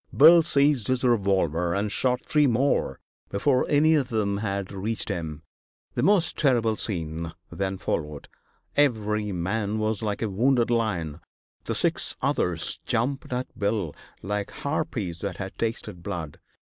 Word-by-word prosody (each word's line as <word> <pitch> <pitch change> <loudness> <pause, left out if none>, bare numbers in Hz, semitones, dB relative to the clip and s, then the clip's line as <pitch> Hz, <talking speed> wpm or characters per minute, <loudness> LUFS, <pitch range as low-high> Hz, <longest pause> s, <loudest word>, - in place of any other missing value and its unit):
Bill 165 +4 +9
seized 140 -6 +2
his 130 0 +1
revolver 95 - +2
and 100 +1 -1
shot 125 +3 0
three 150 -1 +3
more 130 +4 +1 0.3
before 125 +6 +2
any 155 +2 +5
of 140 -5 +1
them 100 -3 0
had 100 -2 -3
reached 105 +3 -3
him. 80 -2 -4 0.5
The - - -1
most 185 -5 +3
terrible 120 -6 +3
scene 85 -5 -4 0.2
then 95 -1 -2
followed. 75 -5 -3 0.5
Every 105 -7 +1
man 100 +4 -1
was 110 -1 -1
like 105 0 -2
a - - +1
wounded 120 +3 +2
lion; 90 -10 -1 0.5
the - - -2
six - - +1
others - - -1
jumped 130 +4 -1
at 125 +1 -4
Bill 100 -6 0 0.3
like 100 +1 -2
harpies 125 - -3
that 95 -2 -3
had 95 -1 -6
tasted 110 -6 -3
blood. 85 -6 -5
105 Hz, 145 wpm, -26 LUFS, 95-125 Hz, 0.5 s, Bill